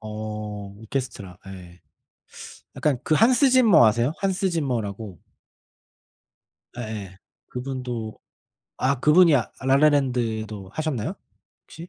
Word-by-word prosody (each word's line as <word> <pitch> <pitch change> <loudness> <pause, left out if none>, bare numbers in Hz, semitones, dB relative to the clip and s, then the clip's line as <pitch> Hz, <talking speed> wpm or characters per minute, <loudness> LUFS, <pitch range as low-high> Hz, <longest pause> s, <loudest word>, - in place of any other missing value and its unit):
어 105 -2 -6
오케스트라 110 -6 -5
예. 90 -2 -12 1.0
약간 145 -5 0
그 155 - +2
Hans 250 - +4
Zimmer아세요? 145 - +5
Hans 190 0 0
Zimmer라고. 110 - -3 1.6
예예. 105 -5 -7 0.3
그분도 125 -4 -5 0.6
아 130 0 0
그분이 160 +1 +6
아 120 - -2
라라랜드도 125 -8 +1
하셨나요? 155 -8 -3 0.5
혹시? 165 +2 -11
120 Hz, 285 characters per minute, -24 LUFS, 105-150 Hz, 1.6 s, 그분이